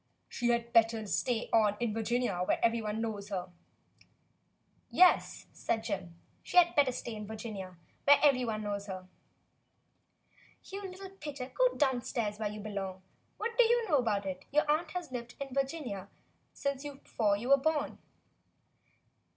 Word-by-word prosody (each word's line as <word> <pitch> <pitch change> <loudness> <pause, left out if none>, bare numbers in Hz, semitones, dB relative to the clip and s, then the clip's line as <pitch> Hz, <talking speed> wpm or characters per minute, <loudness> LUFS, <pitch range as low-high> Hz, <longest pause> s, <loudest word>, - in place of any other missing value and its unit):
^" - - -45 0.2
"She 240 - -2
had 235 0 +3
certainly 235 - -22
better 225 -1 +4
stay 230 +3 -1
on 210 -2 +4
in 235 -3 0
Virginia, 225 -4 0
where - - +1
every 230 0 +2
one 215 +1 -2
knows 210 -3 -4
her," 185 -2 -3
he 175 -1 -33
said. - - -35
"Yes," 365 -1 +5
said 225 -1 -1
Jim, 185 -6 -4 0.3
"she - - -4
had 345 -1 +7
better 280 -3 +4
stay 240 -1 -5
in 210 -1 -6
Virginia, 210 -5 -7 0.3
where 285 0 +8
every 275 -4 +5
one 215 -2 -2
knows 205 0 -3
her." 185 -1 -6 1.6
"You 395 +1 -7
little 380 +1 -9
pitcher, 290 -8 -7
go - - +3
downstairs 240 -6 0
where 215 -1 -1
you 210 0 -7
be 215 +1 -6
long. 190 -2 -4 0.3
What 465 +2 -3
do - - +10
you 470 0 +3
know 305 -6 +4
about 210 -5 0
it? 185 -1 -5
Your 300 +2 +3
aunt 315 +3 +1
has 355 -5 -5
lived 245 -1 -6
in 275 -2 -5
Virginia 270 - -2 0.4
since 280 -1 -2
before 245 -7 -1
you 240 +5 -5
were 275 - +8
born." 300 +1 -1
235 Hz, 175 wpm, -32 LUFS, 205-280 Hz, 1.6 s, do